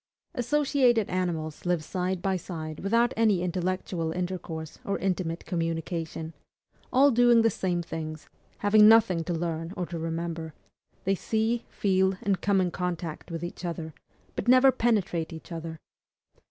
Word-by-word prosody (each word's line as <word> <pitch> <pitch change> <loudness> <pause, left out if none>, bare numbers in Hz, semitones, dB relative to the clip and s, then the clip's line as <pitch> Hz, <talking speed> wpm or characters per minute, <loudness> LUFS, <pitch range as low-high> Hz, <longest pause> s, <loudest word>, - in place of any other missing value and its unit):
Associated 255 -4 +2
animals 170 -4 -2
live 175 -3 0
side 180 +1 -2
by 195 -1 +1
side 160 -3 -6
without 230 +5 +2
any 215 -5 +3
intellectual 180 -2 -2
intercourse 175 -3 -5
or 200 - -1
intimate 180 -3 -2
communication, 165 -1 -3 0.6
all 275 +2 +6
doing 240 -1 +5
the 225 - +4
same 180 -2 -1
things, 155 -2 -6 0.3
having 210 +1 +6
nothing 205 -7 +5
to 175 - -4
learn 165 0 -2
or 180 - -1
to 170 -1 -6
remember; 165 -1 -4 0.5
they 195 - +2
see, 220 +4 0
feel, 190 -1 +2
and 195 -4 0
come 200 -1 +2
in 180 -2 +1
contact 175 -3 -4
with 165 -1 -5
each 175 - -6
other, 165 -2 -4 0.4
but - - -4
never 255 +2 +7
penetrate 205 -10 0
each 160 +2 -10
other. 165 -1 -6
180 Hz, 145 wpm, -27 LUFS, 165-205 Hz, 0.6 s, never